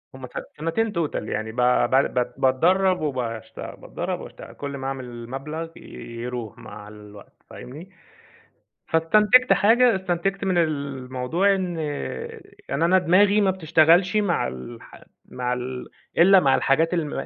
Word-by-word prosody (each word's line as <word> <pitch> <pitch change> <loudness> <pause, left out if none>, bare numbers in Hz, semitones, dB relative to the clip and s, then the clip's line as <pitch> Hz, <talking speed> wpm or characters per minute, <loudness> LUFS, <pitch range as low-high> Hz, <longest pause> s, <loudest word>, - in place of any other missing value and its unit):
هم 130 -1 -9
س - - -23 0.3
سنتين 165 +8 -1
توتال 155 - -3
يعني 110 0 -3
ب 110 - -15 0.4
بع 135 - +5
ب 125 -1 -2
باتدرب 180 +8 +2
وباشت 125 -7 -4
باتدرب - - -5
وباشتغل، - - -11
كل 140 -1 -6
ما 135 - -5
أعمل 125 -3 -7
مبلغ 155 +5 -6
يروح 120 -1 -7
مع 105 0 -11
الوقت، 105 -1 -15
فاهمني. 155 +9 -10 1.0
فاستنتجت 210 +10 +4
حاجة، 235 +2 +4
استنتجت 190 +2 -2
من 185 -2 +1
الموضوع 140 +3 0
إن 180 -3 -3 0.9
يعني 140 +4 0
أنا 185 +2 +4
دماغي 195 +4 +4
ما 195 - +3
بتشتغلش 175 +2 +3
مع 200 - +1
الح 65 - -10 0.2
مع 125 0 -3
ال 125 0 -5 0.3
إلا 190 +2 +7
مع 135 -4 +3
الحاجات 165 +6 +2
الم 155 -4 -2
155 Hz, 135 wpm, -23 LUFS, 125-185 Hz, 1.0 s, إلا